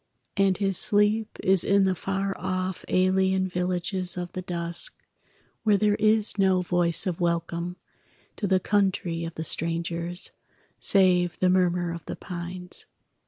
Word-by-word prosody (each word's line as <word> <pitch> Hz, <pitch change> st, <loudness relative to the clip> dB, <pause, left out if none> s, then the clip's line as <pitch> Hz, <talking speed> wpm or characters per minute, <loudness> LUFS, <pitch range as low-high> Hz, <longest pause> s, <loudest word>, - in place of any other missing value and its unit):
And 195 Hz, -1 st, +2 dB
his 195 Hz, -3 st, 0 dB
sleep 210 Hz, +1 st, +1 dB
is 190 Hz, -1 st, +3 dB
in 200 Hz, 0 st, +3 dB
the 190 Hz, -, +2 dB
far 195 Hz, +2 st, -3 dB
off 185 Hz, 0 st, -3 dB
Alien 190 Hz, 0 st, +2 dB
villages 180 Hz, 0 st, -2 dB
of 175 Hz, -1 st, -4 dB
the 185 Hz, -, -4 dB
dusk, 170 Hz, -1 st, -1 dB, 0.6 s
Where 210 Hz, -2 st, +3 dB
there 210 Hz, +1 st, +2 dB
is 215 Hz, 0 st, +2 dB
no 190 Hz, -1 st, +3 dB
voice 175 Hz, -1 st, +1 dB
of 180 Hz, -3 st, -2 dB
welcome 170 Hz, +1 st, -2 dB, 0.6 s
To 205 Hz, -, -2 dB
the 190 Hz, -1 st, +3 dB
country 185 Hz, -4 st, 0 dB
of 165 Hz, -, -7 dB
the 160 Hz, -, -4 dB
strangers, 170 Hz, +2 st, 0 dB, 0.5 s
Save 180 Hz, -3 st, +3 dB
the 185 Hz, 0 st, +2 dB
murmur 180 Hz, -1 st, +1 dB
of 170 Hz, -, -8 dB
the -, -, -4 dB
pines. 180 Hz, 0 st, -7 dB
185 Hz, 145 wpm, -26 LUFS, 175-195 Hz, 0.6 s, is